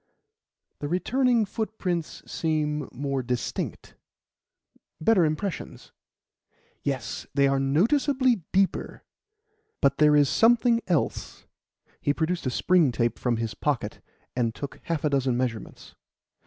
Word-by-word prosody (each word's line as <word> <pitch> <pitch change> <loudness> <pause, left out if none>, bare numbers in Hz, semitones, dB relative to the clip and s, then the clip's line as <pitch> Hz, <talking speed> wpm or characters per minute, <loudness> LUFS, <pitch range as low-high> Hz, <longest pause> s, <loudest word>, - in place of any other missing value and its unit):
"The 145 - -3
returning 235 - +2
footprints 190 -6 -3
seem 150 -3 -1
more 140 +1 -2
distinct 125 -1 -4 1.1
better 190 +1 +4
impressions." 160 +4 -3 0.9
"Yes; 130 -6 -3
they 140 -1 +4
are 135 0 +2
noticeably 240 - +2
deeper. 195 0 0 0.8
But 140 -2 +2
there 150 -1 +6
is 145 -1 +5
something 235 - +4
else." 170 -6 -2 0.6
He 145 - +1
produced 165 -2 -1
a - - +2
spring 170 +1 +3
tape 120 0 -1
from 120 -2 0
his 115 -1 -3
pocket, 120 -8 -2 0.3
and 115 -3 0
took 140 - -7
half 165 -3 -2
a 150 - +2
dozen 130 -3 +1
measurements. 120 -4 -4
150 Hz, 115 wpm, -26 LUFS, 135-190 Hz, 1.1 s, there